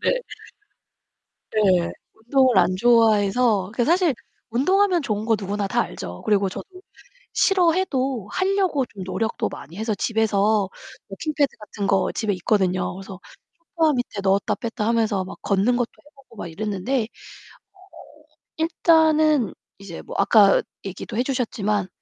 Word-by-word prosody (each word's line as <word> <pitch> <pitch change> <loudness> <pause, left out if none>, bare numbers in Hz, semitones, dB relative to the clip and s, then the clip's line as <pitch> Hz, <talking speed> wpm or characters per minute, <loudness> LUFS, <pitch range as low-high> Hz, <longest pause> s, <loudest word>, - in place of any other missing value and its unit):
네. - - +1 1.3
네, 185 -5 +2 0.2
운동을 245 0 +2
안 185 - +3
좋아해서 220 -2 +3
그게 235 +1 0
사실 345 -1 +3 0.4
운동하면 365 - +2
좋은 215 -4 -3
거 225 - +3
누구나 200 0 -2
다 240 +4 +1
알죠. 90 - -7
그리고 200 -2 +2
저도 - - -8 0.7
싫어해도 315 - +1
하려고 375 -7 +1
좀 195 -4 -10
노력도 220 +4 -2
많이 170 - -11
해서 220 +1 -1
집에서 210 -2 +1 0.4
워킹 305 +11 -4
패드 285 -3 +2
같은 210 -1 -5
거 195 - +2
집에 215 -3 -1
있거든요. 185 0 0
그래서 195 -1 -9 0.6
소파 320 -2 +3
밑에 245 -5 -3
넣었다 195 +1 +1
뺐다 225 -2 -4
하면서 225 -4 +1
막 190 - -9
걷는 200 +5 +1
것도 245 -1 -1 0.2
해 - - -18
보고 265 -4 -20
막 175 - -6
이랬는데 210 +7 -2
어 215 - -13 1.3
일단은 315 -4 +3 0.3
이제 195 -4 -9
뭐 - - -9
아까 200 0 +5 0.2
얘기도 195 +2 -7
해 245 - +2
주셨지만 210 -7 -1
220 Hz, 295 characters per minute, -23 LUFS, 200-270 Hz, 1.3 s, 아까